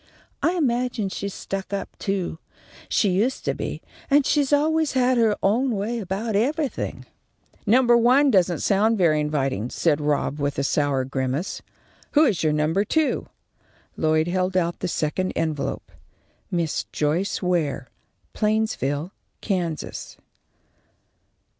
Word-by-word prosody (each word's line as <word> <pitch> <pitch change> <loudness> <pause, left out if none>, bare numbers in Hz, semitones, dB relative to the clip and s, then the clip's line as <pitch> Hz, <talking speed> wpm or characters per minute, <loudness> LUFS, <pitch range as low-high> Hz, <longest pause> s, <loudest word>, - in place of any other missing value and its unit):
I 335 - +2
imagine 245 - 0
she's 200 +1 -5
stuck 195 0 -5
up, 200 -1 -4
too. 190 -5 -2 0.5
She 210 - +2
used 220 +8 0
to - - +1
be, - - -5 0.3
and 285 -1 +4
she's 290 -2 +2
always 310 +1 +2
had 255 -1 +3
her 220 -2 +3
own 235 +5 +2
way 220 +4 -2
about 205 +2 -3
everything." 285 +6 -1 0.6
"Number 240 +2 +5
one 255 +4 +5
doesn't 180 -5 +2
sound 215 +3 +2
very 165 -5 +3
inviting," 135 -6 -1
said 150 0 +1
Rob, 145 0 0
with 140 0 -1
a 140 - 0
sour 140 -2 +1
grimace. 135 +6 -2 0.5
"Who 305 +1 +6
is 215 - +1
your 155 - +2
number 155 +6 +1
two?" 315 +8 0 0.7
Lloyd 155 +1 +2
held 185 +1 0
out 170 -1 0
the - - -2
second 175 +3 -1
envelope. 155 -3 -2 0.6
_Miss 170 -3 -1
Joyce 170 +7 -1
Ware, 160 -8 0 0.4
Plainsville, 210 - 0 0.3
Kansas. 175 -6 -3
190 Hz, 130 wpm, -24 LUFS, 155-235 Hz, 0.7 s, Who